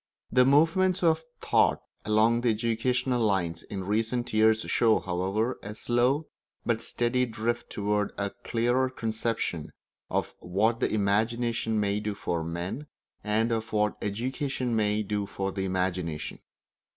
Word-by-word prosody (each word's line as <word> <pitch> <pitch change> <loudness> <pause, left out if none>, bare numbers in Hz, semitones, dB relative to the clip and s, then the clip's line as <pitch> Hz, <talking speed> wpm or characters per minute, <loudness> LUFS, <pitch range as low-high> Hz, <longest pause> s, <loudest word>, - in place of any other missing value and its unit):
The 125 0 +5
movements 175 +7 +3
of 160 -1 +3 0.2
thought - - +3 0.3
along 110 +3 +3
educational 120 +3 +1
lines 90 -6 +1
in 95 -2 -6
recent 115 +5 -1
years 110 0 +4
show, 115 -1 +3
however, 95 +7 -1
a 105 +1 -7
slow 125 +7 +1 0.4
but 115 -1 +1
steady 125 +1 +1
drift 120 +1 -2
toward 105 0 0
a 100 -1 -1
clearer 120 +3 +1
conception 110 -8 -2 0.4
of - - -1
what 110 +6 +1
the - - +1
imagination 110 +2 +1
may 100 0 +1
do 105 -1 -3
for 85 -4 -2
men, 85 - -4 0.4
and 110 +2 +1
of 110 -1 -2
what 105 -1 +2
education 125 +3 -2
may 105 -1 +1
do 105 0 -2
for 95 0 -3
the 95 0 -2
imagination. 90 -4 -2
110 Hz, 135 wpm, -28 LUFS, 100-120 Hz, 0.4 s, The